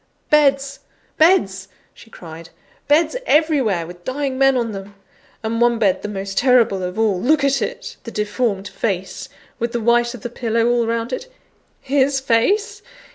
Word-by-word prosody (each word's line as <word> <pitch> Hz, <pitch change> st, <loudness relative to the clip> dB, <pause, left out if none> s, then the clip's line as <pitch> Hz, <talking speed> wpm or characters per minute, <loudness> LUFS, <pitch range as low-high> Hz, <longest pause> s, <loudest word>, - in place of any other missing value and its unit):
"Beds! 275 Hz, -2 st, +2 dB, 0.4 s
beds!" 195 Hz, -, +3 dB, 0.3 s
she -, -, -17 dB
cried, 165 Hz, -4 st, -11 dB, 0.4 s
"beds 310 Hz, +7 st, +3 dB
everywhere, 275 Hz, -, +2 dB
with 175 Hz, +1 st, -12 dB
dying 270 Hz, +2 st, -3 dB
men 270 Hz, 0 st, +3 dB
on 235 Hz, -2 st, -1 dB
them! 200 Hz, 0 st, -9 dB, 0.5 s
And 230 Hz, +1 st, -2 dB
one 240 Hz, -1 st, +3 dB
bed 200 Hz, -5 st, +1 dB
the -, -, -4 dB
most 195 Hz, -1 st, -3 dB
terrible 245 Hz, -7 st, +3 dB
of 180 Hz, +1 st, -5 dB
all 210 Hz, -5 st, +1 dB
look 290 Hz, +3 st, +2 dB
at 275 Hz, -2 st, +2 dB
it! 210 Hz, -, -5 dB
The -, -, -7 dB
deformed 210 Hz, -2 st, -2 dB
face, 190 Hz, -3 st, -4 dB, 0.3 s
with 235 Hz, 0 st, -2 dB
the 240 Hz, -, -1 dB
white 235 Hz, +1 st, +2 dB
of 235 Hz, -, -11 dB
the 240 Hz, -, -5 dB
pillow 230 Hz, -1 st, 0 dB
all 240 Hz, -1 st, +1 dB
round 230 Hz, +2 st, -2 dB
it! -, -, -6 dB, 0.5 s
His 275 Hz, 0 st, +1 dB
face? 400 Hz, -, +1 dB
235 Hz, 165 wpm, -20 LUFS, 205-275 Hz, 0.5 s, beds